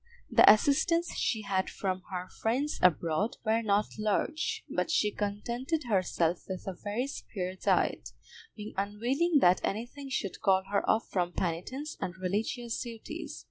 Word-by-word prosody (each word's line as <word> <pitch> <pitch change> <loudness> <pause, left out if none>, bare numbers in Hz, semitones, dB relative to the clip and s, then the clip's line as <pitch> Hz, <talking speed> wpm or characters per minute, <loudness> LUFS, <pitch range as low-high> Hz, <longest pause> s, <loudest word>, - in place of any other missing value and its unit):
The - - +9
assistance 335 - +2
she 220 -2 0
had 190 -2 0
from 185 -2 -2
her 180 0 -4
friends 255 +10 -1
abroad 175 +4 +2
were 220 +1 +2
not 210 -1 0
large, 215 +10 0
but - - -1
she 210 -9 +2
contented 235 +10 -2
herself 180 -6 0
with 185 -1 -5
a 190 - -3
very 205 +7 -3
spare 185 -9 -5
diet, - - +1 0.5
being 210 0 -7
unwilling 245 - +1
that 180 +1 +5
anything 240 +7 -4
should 200 -7 -3
call 190 -1 +4
her 200 - +2
off 220 - +2
from 175 -2 0
penitence 220 - -3
and 180 +1 -3
religious 220 +5 -2
duties. 230 -3 -7
210 Hz, 145 wpm, -30 LUFS, 185-245 Hz, 0.5 s, The